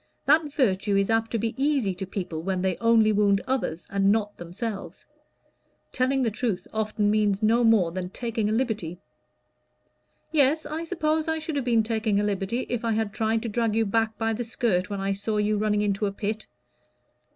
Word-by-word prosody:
"That 300 +1 +3
virtue 205 -7 +1
is 195 +2 +1
apt 225 0 +1
to 230 - -1
be 225 +1 -2
easy 275 -10 +1
to 190 +1 -6
people 175 -5 -4
when 185 +1 -2
they 190 -2 +1
only 230 -2 +4
wound 200 -1 +3
others 240 -11 -2
and 195 0 +2
not 210 -1 0
themselves. 195 +5 -6 0.9
Telling 260 +1 +1
the 230 - +1
truth 205 -5 -2
often 215 -1 0
means 210 -1 +1
no 230 +3 +4
more 215 -7 +4
than 180 0 -4
taking 225 0 -2
a - - 0
liberty." 215 -8 -1 1.3
"Yes, 305 +1 +3
I 320 +2 -4
suppose 315 -2 0
I 320 0 0
should 315 -1 -4
have 275 -3 -1
been 230 -3 +3
taking 220 -2 0
a - - +1
liberty 205 +4 -1
if 245 -1 -3
I 230 -1 +1
had 215 -1 -1
tried 220 0 0
to - - -3
drag 225 0 0
you 225 0 +2
back 225 +1 0
by 225 0 0
the 235 +3 -3
skirt 220 -5 0
when 200 -1 -3
I 195 0 -1
saw 205 +2 -2
you 210 0 +1
running 210 -1 +1
into 205 0 0
a - - -2
pit." 210 +2 -4
220 Hz, 195 wpm, -26 LUFS, 200-235 Hz, 1.3 s, only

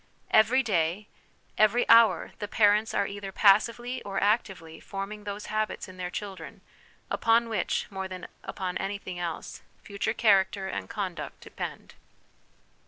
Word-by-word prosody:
Every 245 +5 +5
day, 185 -1 0 0.5
every 220 +3 +4
hour, 230 -6 +6
the 205 - -4
parents 210 +1 +3
are - - +2
either 200 -1 -6
passively 230 +6 +3
or 195 -1 -3
actively 190 -6 -1
forming 205 +1 -6
those 205 0 -5
habits 215 -1 -2
in 185 0 -12
their 180 -1 -4
children 195 0 -7 0.5
upon 230 +1 +3
which, 220 - -1
more 190 -1 -4
than 185 -1 -8 0.2
upon 185 -1 -4
anything 195 -2 -4
else, 170 -2 -5 0.2
future 200 +2 -2
character 195 -2 +3
and - - -5
conduct 190 -5 -5
depend. - - -7
200 Hz, 135 wpm, -28 LUFS, 190-215 Hz, 0.5 s, hour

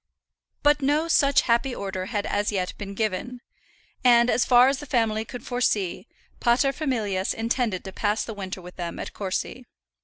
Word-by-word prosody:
But 295 0 +4
no 295 +4 +1
such 280 -4 +4
happy 245 +2 +1
order 190 -2 -4
had 205 0 -2
as 205 +1 0
yet 185 -3 -2
been 200 -1 -6
given; 220 +4 -2 0.6
and, 240 -1 +5
as 245 - +2
far 250 0 +6
as 270 0 +1
the 295 - -9
family 225 -4 +1
could 245 +2 -9
foresee, 215 -7 -1 0.3
paterfamilias 240 -6 +1
intended 230 -4 -1
to 190 - -7
pass 210 +2 0
the 225 - -6
winter 190 -2 -6
with 180 +1 -12
them 170 -2 -5
at - - -6
Courcy. 200 +5 -4
225 Hz, 165 wpm, -25 LUFS, 200-255 Hz, 0.6 s, far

